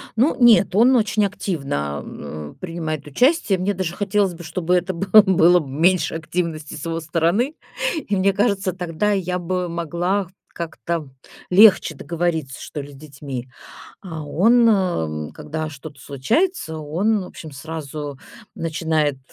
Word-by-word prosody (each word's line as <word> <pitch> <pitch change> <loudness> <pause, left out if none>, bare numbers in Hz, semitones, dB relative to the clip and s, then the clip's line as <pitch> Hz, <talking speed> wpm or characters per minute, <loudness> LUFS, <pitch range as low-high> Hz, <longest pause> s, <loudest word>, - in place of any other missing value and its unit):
Ну 250 +4 +3
нет, 220 -5 +5
он 250 +4 +6
очень 215 -2 +2
активно, 140 - -3
а, 75 +3 -8
принимает 160 -4 -4
участие. 245 - +2
Мне 200 +2 0
даже 180 -2 -3
хотелось 200 -2 +1
бы, 170 +1 -10
чтобы 175 +2 0
это 180 +1 0
было 195 +5 +6 0.3
было 180 0 +6
б 145 - -7
меньше 165 +4 +2
активности 160 -1 -3
с 150 - -7
его 165 0 -2
стороны, 170 - 0 0.5
и 205 - 0
мне 195 +1 +2
кажется, 200 -2 +1
тогда 180 +3 -1
я 180 -2 -1
бы 180 0 -2
могла 170 +3 -1 0.2
как-то 165 -2 -4 0.4
легче 190 -4 +6
договориться, 160 -3 -3
что 150 - -6
ли, 145 +1 -10
с - - -13
детьми. 140 -3 -7 0.5
А 160 -5 -7
он, 230 +10 +4 0.6
э, - - -12
когда 155 +1 -5
что-то 145 -2 -11
случается, 160 - -1
он, 185 +8 0
в - - -8
общем, 160 -3 -10
сразу 145 -1 -6 0.4
начинает 160 -3 0
170 Hz, 145 wpm, -21 LUFS, 155-195 Hz, 0.6 s, он